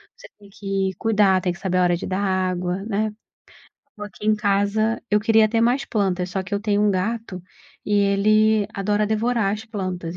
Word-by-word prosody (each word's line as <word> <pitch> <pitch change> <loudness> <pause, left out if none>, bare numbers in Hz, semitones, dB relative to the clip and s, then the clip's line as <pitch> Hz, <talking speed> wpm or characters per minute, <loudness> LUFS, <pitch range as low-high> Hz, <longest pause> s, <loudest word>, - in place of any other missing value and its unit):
você - - -14
tem 200 -1 -17
que 195 -2 -2
cuidar 205 -4 +3
tem 180 -1 -1
que 175 - -14
saber 185 -1 -1
a 180 - +3
hora 175 -1 +2
de - - -6
dar 185 +1 -2
água, 185 -1 -1
né. 215 0 -1 0.9
Eu 210 - -5
aqui 205 0 -12
em 215 0 +3
casa, 210 +2 0
eu 210 0 +3
queria 220 0 +4
ter 225 +1 0
mais 245 +4 +2
plantas, 185 -4 -1
só 190 +1 -2
que 190 +2 -5
eu 200 - -1
tenho 205 -1 0
um 210 0 +3
gato 195 0 -3 0.4
e 210 - -3
ele 205 +1 +3
adora 205 +1 0
devorar 220 -1 0
as 215 +1 -5
plantas, 185 -5 -5
205 Hz, 200 wpm, -22 LUFS, 190-215 Hz, 0.9 s, queria